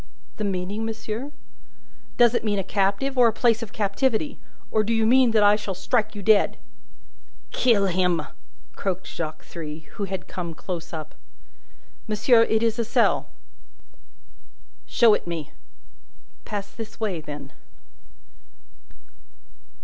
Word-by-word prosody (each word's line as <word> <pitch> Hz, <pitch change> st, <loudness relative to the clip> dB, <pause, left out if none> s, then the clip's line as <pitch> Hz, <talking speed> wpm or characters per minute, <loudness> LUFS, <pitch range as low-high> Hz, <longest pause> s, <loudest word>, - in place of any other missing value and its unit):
"The 215 Hz, -, -3 dB
meaning, 195 Hz, +2 st, -2 dB
monsieur?" 225 Hz, +4 st, -4 dB, 0.9 s
"Does 240 Hz, -1 st, +6 dB
it 235 Hz, -, 0 dB
mean 210 Hz, -2 st, 0 dB
a 195 Hz, -, 0 dB
captive, 200 Hz, +8 st, 0 dB
or 240 Hz, -, +7 dB
a -, -, +3 dB
place 230 Hz, +1 st, +2 dB
of 225 Hz, -2 st, -6 dB
captivity? 230 Hz, +7 st, 0 dB, 0.3 s
Or 215 Hz, -, +3 dB
do 230 Hz, +2 st, 0 dB
you 225 Hz, -1 st, +2 dB
mean 255 Hz, +2 st, +5 dB
that 220 Hz, -2 st, +4 dB
I 205 Hz, 0 st, +6 dB
shall 205 Hz, -2 st, -4 dB
strike 215 Hz, +3 st, 0 dB
you 205 Hz, -, -6 dB
dead?" 210 Hz, +1 st, +4 dB, 0.9 s
"Kill 225 Hz, -6 st, +3 dB
him!" 180 Hz, -3 st, +1 dB, 0.5 s
croaked 190 Hz, -1 st, -3 dB
Jacques 155 Hz, -2 st, -5 dB
Three, 155 Hz, -2 st, -7 dB, 0.2 s
who -, -, +1 dB
had 190 Hz, -1 st, -5 dB
come 170 Hz, -3 st, -5 dB
close 175 Hz, -1 st, -6 dB
up. 155 Hz, -2 st, -6 dB, 0.9 s
"Monsieur, 225 Hz, +2 st, +4 dB
it 220 Hz, 0 st, +2 dB
is 230 Hz, 0 st, +1 dB
a -, -, +2 dB
cell." 230 Hz, -, +2 dB, 1.6 s
"Show 230 Hz, -3 st, +5 dB
it -, -, -1 dB
me!" 165 Hz, -4 st, -4 dB, 0.9 s
"Pass 200 Hz, -1 st, -5 dB
this 220 Hz, +2 st, -9 dB
way, 200 Hz, -7 st, -2 dB
then." 145 Hz, -2 st, -8 dB
210 Hz, 135 wpm, -24 LUFS, 185-225 Hz, 1.6 s, or